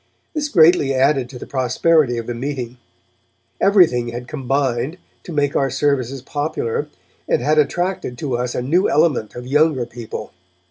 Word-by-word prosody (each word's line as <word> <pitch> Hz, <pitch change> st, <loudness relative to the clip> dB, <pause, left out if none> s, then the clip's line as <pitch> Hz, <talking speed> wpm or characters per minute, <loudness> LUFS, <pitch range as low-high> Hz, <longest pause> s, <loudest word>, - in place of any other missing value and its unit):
This 300 Hz, -2 st, -2 dB
greatly 160 Hz, -, +4 dB
added 135 Hz, -1 st, +2 dB
to 130 Hz, -, -9 dB
the -, -, -8 dB
prosperity 130 Hz, +1 st, +2 dB
of 115 Hz, -, -4 dB
the 120 Hz, -, -4 dB
meeting. 125 Hz, -1 st, -5 dB, 0.8 s
Everything 170 Hz, -, +4 dB
had 120 Hz, +1 st, -6 dB
combined 135 Hz, +1 st, -1 dB, 0.2 s
to -, -, -10 dB
make 145 Hz, -2 st, 0 dB
our 135 Hz, -, +2 dB
services 135 Hz, -2 st, -1 dB
popular, 145 Hz, -2 st, -2 dB, 0.4 s
and -, -, +3 dB
had 155 Hz, +1 st, +2 dB
attracted 175 Hz, -4 st, -1 dB
to 130 Hz, -2 st, -2 dB
us 125 Hz, 0 st, -2 dB
a 125 Hz, -, -2 dB
new 170 Hz, +9 st, +2 dB
element 150 Hz, -9 st, +1 dB
of 120 Hz, 0 st, -7 dB
younger 145 Hz, -1 st, +2 dB
people. 115 Hz, -2 st, -8 dB
135 Hz, 155 wpm, -20 LUFS, 125-155 Hz, 0.8 s, greatly